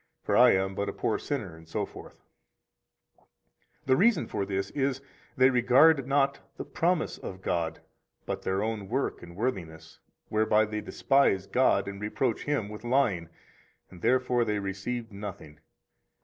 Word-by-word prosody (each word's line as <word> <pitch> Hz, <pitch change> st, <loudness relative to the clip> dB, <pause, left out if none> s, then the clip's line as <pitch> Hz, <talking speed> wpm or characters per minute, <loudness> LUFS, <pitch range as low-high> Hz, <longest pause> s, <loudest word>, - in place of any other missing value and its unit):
For -, -, 0 dB
I -, -, +7 dB
am 95 Hz, 0 st, 0 dB
but 100 Hz, +1 st, -2 dB
a -, -, -5 dB
poor 110 Hz, -, -1 dB
sinner, 105 Hz, -, -4 dB
etc. 80 Hz, 0 st, -3 dB
122 -, -, -16 dB, 0.6 s
The 130 Hz, -, +4 dB
reason 220 Hz, -, +3 dB
for 100 Hz, -, -3 dB
this 100 Hz, 0 st, -2 dB
is, 135 Hz, -2 st, -1 dB, 0.4 s
they 130 Hz, +1 st, +6 dB
regard 130 Hz, +3 st, +5 dB
not 140 Hz, 0 st, +2 dB, 0.2 s
the -, -, -5 dB
promise 170 Hz, -1 st, 0 dB
of 95 Hz, 0 st, -8 dB
God, 80 Hz, -2 st, -2 dB, 0.4 s
but -, -, -4 dB
their 95 Hz, +2 st, -1 dB
own 110 Hz, -3 st, -3 dB
work 135 Hz, +4 st, -2 dB
and 85 Hz, 0 st, -11 dB
worthiness, 85 Hz, -8 st, -4 dB, 0.3 s
whereby 110 Hz, 0 st, +3 dB
they 105 Hz, 0 st, -4 dB
despise 135 Hz, -10 st, +2 dB
God 130 Hz, -2 st, +2 dB
and 100 Hz, 0 st, -6 dB
reproach 110 Hz, +3 st, -1 dB
Him 145 Hz, -8 st, -1 dB
with 105 Hz, +2 st, -9 dB
lying, 120 Hz, -10 st, +1 dB, 0.6 s
and 90 Hz, -2 st, -13 dB
therefore 125 Hz, -1 st, +2 dB
they 105 Hz, -2 st, -1 dB
receive 105 Hz, +4 st, -4 dB
nothing. 100 Hz, -7 st, -8 dB
110 Hz, 150 wpm, -28 LUFS, 95-130 Hz, 0.6 s, I